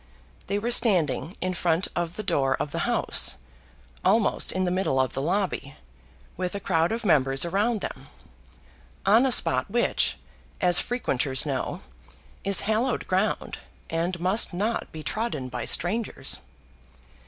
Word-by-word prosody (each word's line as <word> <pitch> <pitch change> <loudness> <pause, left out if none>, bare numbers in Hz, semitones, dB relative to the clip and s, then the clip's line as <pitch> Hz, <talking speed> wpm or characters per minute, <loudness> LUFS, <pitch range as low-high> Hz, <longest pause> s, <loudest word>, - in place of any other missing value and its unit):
They 200 - 0
were 230 +4 -2
standing 185 - +2
in 185 0 -1
front 175 0 +1
of 175 0 -2
the 215 - -4
door 135 -8 +1
of 145 - -3
the 170 +9 -2
House, 235 - +1 0.7
almost 225 -2 +2
in 185 0 -1
the 180 - 0
middle 185 -8 0
of 130 -2 +1
the 135 - -2
lobby, 175 -4 -1 0.6
with 180 +1 -3
a - - -2
crowd 165 -3 +1
of 230 0 -3
members 135 -4 +3
around 205 +5 0
them, - - -6 1.0
on 225 +7 +5
a - - 0
spot - - +3
which, - - +1 0.4
as 180 -1 +5
frequenters 140 - 0
know, 135 -3 -3 0.6
is 200 0 +3
hallowed 225 +4 0
ground, 190 +3 -1 0.3
and 170 +2 -1
must 185 +2 +2
not 210 +6 -2
be 155 -1 -8
trodden 215 - -3
by 125 -1 -4
strangers. 175 -7 0
185 Hz, 145 wpm, -26 LUFS, 155-215 Hz, 1.0 s, on